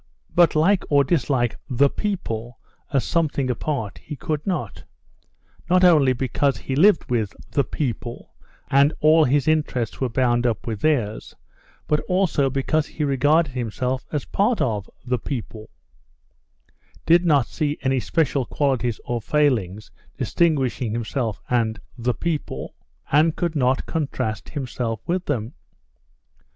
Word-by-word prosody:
But 170 -3 +4
like 180 +5 +3
or 140 -1 +5
dislike 130 -5 0
"the 135 +2 +4
people" 125 - -4 0.3
as 135 -3 +2
something 145 -6 0
apart 120 -5 -3
he 150 - -8
could 155 0 -3
not, 150 - -3 0.9
not 185 +1 +4
only 155 -7 +6
because 130 +1 0
he 130 - -4
lived 180 +4 +4
with 110 -5 0 0.2
"the 140 - +2
people," 120 -5 -5 0.4
and 140 +2 +4
all 155 +1 +5
his 140 +2 +1
interests 145 -8 0
were 130 - +1
bound 120 0 +2
up 115 -2 -2
with 110 -3 -4
theirs, 120 -9 0 0.5
but 150 - +2
also 180 -7 +2
because 140 +3 0
he 155 - -4
regarded 145 +3 +2
himself 125 +1 -2
as 150 -3 -1
a - - -18
part 215 +4 +1
of 105 -5 -1 0.2
"the 125 -1 0
people," 110 -4 -6 1.4
did 170 +2 +5
not 145 -7 +3
see 150 +2 -2
any 130 -1 +2
special 140 -1 0
qualities 125 -5 0
or 120 -1 -2
failings 110 -8 0 0.3
distinguishing 135 -8 0
himself 115 -1 -2
and 115 -4 0 0.2
"the 125 0 -1
people," 165 -3 -3 0.4
and 155 +2 +4
could 170 -2 -2
not 130 -2 +1
contrast 135 -9 -3
himself 125 -5 -3
with 180 +1 -1
them. 120 -5 -2
135 Hz, 140 wpm, -23 LUFS, 120-155 Hz, 1.4 s, only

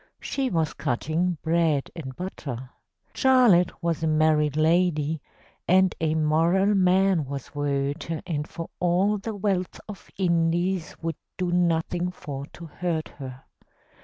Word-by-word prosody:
She 270 -2 -2
was 160 -5 0
cutting 160 +8 -1
bread 160 -4 +1
and 130 -6 -7
butter. 130 -8 -6 0.4
Charlotte 240 -11 +4
was 170 -1 0
a 160 - +1
married 155 -1 +2
lady, 160 -2 +2 0.5
And 185 0 +4
a 160 -1 +1
moral 165 +6 +3
man 190 -2 +3
was 135 -1 -7
Werther, 145 +2 -2
And 150 -4 -2
for 165 -1 -7
all 185 +4 +2
the 220 +2 -5
wealth 190 -3 -1
of 210 -3 -10
Indies, 175 0 +1
Would 165 0 -2 0.2
do 180 -1 -1
nothing 175 0 +1
for 140 -6 -7
to 170 - -11
hurt 165 0 -3
her. 130 -1 -8
165 Hz, 135 wpm, -25 LUFS, 155-180 Hz, 0.5 s, Charlotte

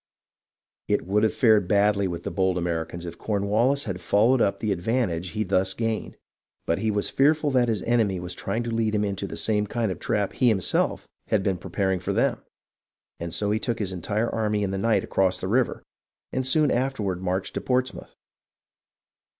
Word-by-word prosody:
It - - 0
would 100 +3 +1
have 110 - +3
fared 110 -6 +4
badly 100 -1 +3
with 85 -1 -5
the - - -4
bold 95 -2 +1
Americans 85 0 -3
if 85 - -8
Cornwallis 110 +7 +1
had 95 -5 -5
followed 115 +8 +3
up 100 - +2
the 110 - -2
advantage 90 -3 -1
he 110 +2 -2
thus 95 0 +1
gained, 115 -2 -3 0.5
but 85 - 0
he 110 - 0
was 105 -1 0
fearful 150 +1 +3
that 125 -2 +3
his 110 -5 -1
enemy 110 -6 +1
was 90 0 -5
trying 115 +6 -3
to 120 - -4
lead 110 -1 0
him 105 0 +1
into 100 0 -3
the - - -7
same 105 -1 0
kind 115 -2 -1
of - - -4
a - - -21
trap 100 -2 -1
he 125 - +2
himself 100 -7 +1 0.2
had 105 -3 +1
been 95 -3 0
pre - - -9
paring 95 -2 0
for 90 - -2
them, - - +1 0.8
and 85 0 -5
so 105 +3 0
he 110 - +1
took 120 0 -2
his 95 -3 -2
entire 105 +6 -1
army 105 -2 0
in 95 - -1
the 95 - -2
night 115 +2 +2
across 95 -1 +1
the 95 - -4
river, 120 +5 +1 0.5
and 130 0 -1
soon 150 +1 +3
afterward 115 -8 -1
marched 95 0 -2
to - - -3
Portsmouth. 130 0 -2
105 Hz, 200 wpm, -25 LUFS, 95-115 Hz, 0.8 s, fared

